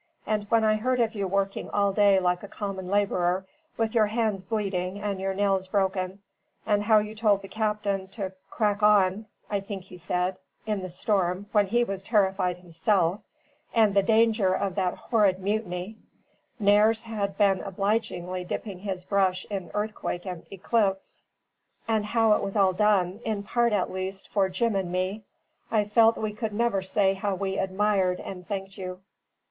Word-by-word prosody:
And 210 -1 -1
when 230 -1 +3
I 215 0 +3
heard 250 +3 0
of 230 -1 +1
you 200 -3 -2
working 195 +1 -1
all 200 -1 +1
day 200 -1 +5
like 180 -1 0
a 205 - -8
common 195 -3 -5
labourer, 190 -2 +1 0.3
with 225 0 0
your 220 -3 +4
hands 215 -3 0
bleeding 195 -2 -2
and 200 -2 -3
your 195 0 -1
nails 195 -1 +1
broken 190 0 -1 0.4
and 205 -1 +2
how 215 +1 +4
you 210 0 0
told 210 -3 +2
the - - -7
captain 210 -3 -1
to 190 -1 -5 0.2
'crack 210 -1 0
on' 210 0 +4 0.2
(I 205 - -1
think 195 -1 -7
he 180 -1 -13
said) 180 +2 -1 0.3
in 210 -2 -1
the 185 - -5
storm, 185 0 0
when 205 -2 +3
he 240 +4 +2
was 195 -4 -4
terrified 190 -4 +1
himself 180 +2 0 0.5
and 220 -3 +4
the 200 - +5
danger 220 -2 +3
of 195 -2 -1
that 185 -1 0
horrid 205 -5 +2
mutiny" 195 0 -3 0.6
(Nares 210 +2 +4
had 205 -4 -3
been 195 -3 +3
obligingly 190 -2 -2
dipping 190 +1 -5
his 190 -2 -4
brush 185 -1 +1
in 190 -4 -4
earthquake 210 -4 -3
and 180 -3 -7
eclipse) 195 0 -1 0.6
"and 220 -2 +1
how 225 0 +3
it - - +1
was 195 - -4
all 195 -2 +4
done, 195 -1 +2
in 215 -2 -2
part 235 +2 +1
at 205 -3 0
least, 190 +1 -5
for 195 -2 +1
Jim 215 +4 0
and 190 -3 -1
me 185 +4 -2 0.4
I 215 -2 +2
felt 225 +2 +4
we 215 -1 -2
could 215 0 -4
never 225 -3 +1
say 190 +1 +2
how 195 0 -2
we 190 0 -2
admired 190 -1 +1
and 180 -2 -8
thanked 195 -1 -5
you." 185 0 -6
200 Hz, 175 wpm, -26 LUFS, 190-215 Hz, 0.6 s, day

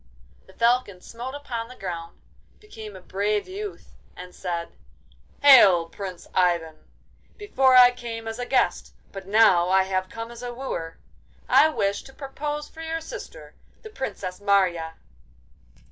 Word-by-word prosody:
The - - -17
Falcon 235 -5 +1
smote 245 +6 -8
upon 240 -5 -5
the 255 - -12
ground, 170 -5 -7 0.4
became 220 - -11
a 185 - -11
brave 205 +3 -1
youth, 400 +2 -7 0.3
and 180 0 -10
said: 170 -2 -4 0.7
'Hail, 195 -12 +7
Prince 185 -1 -8
Ivan! 170 -3 +1 0.6
Before 270 - +2
I 250 -1 +9
came 230 -2 -7
as 225 +2 -5
a 245 - -4
guest, 260 - 0 0.2
but 195 -1 -9
now 195 -4 +4
I 190 0 +4
have 185 0 -2
come 230 +2 -7
as 235 0 -10
a 245 -1 -6
wooer! 165 -11 -5 0.5
I 315 - +6
wish 200 -9 -1
to 270 - -14
propose 295 +2 -5
for 325 - -12
your 325 0 -3
sister, - - -10 0.3
the 440 - -10
Princess 200 - -6
Marya. 180 -5 +1
225 Hz, 145 wpm, -24 LUFS, 185-265 Hz, 0.7 s, I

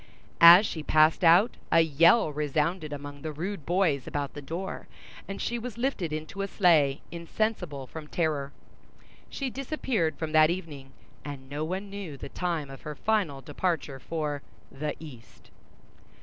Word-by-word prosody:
As 175 +5 +10
she 160 - -4
passed 155 +3 +3
out, 175 +7 +5
a 165 - +6
yell 165 +3 +4
resounded 150 +2 -1
among 145 0 -7
the 155 - -4
rude 170 +2 -5
boys 170 -7 +1
about 145 -1 -3
the 145 - -7
door, 170 +7 -6 0.4
and 195 - -6
she 240 0 -2
was 235 -1 -7
lifted 235 - -1
into 155 +6 -5
a 200 - -1
sleigh, 155 -8 +3
insensible 170 -4 -3
from 150 +4 -9
terror. 150 -4 -1 0.8
She 270 -2 -4
disappeared 255 - -2
from 160 -1 -4
that 155 0 +6
evening, 155 -7 -5 0.3
and 140 -2 -8
no 145 +3 -4
one 190 +5 -4
knew 195 -8 -7
the 140 - -8
time 165 -5 -3
of 135 - -11
her 150 0 -6
final 185 -9 0
departure 150 -2 -2
for 150 -1 -3 0.3
"the 150 +2 -4
east." 135 -8 -13
160 Hz, 155 wpm, -28 LUFS, 145-185 Hz, 0.8 s, As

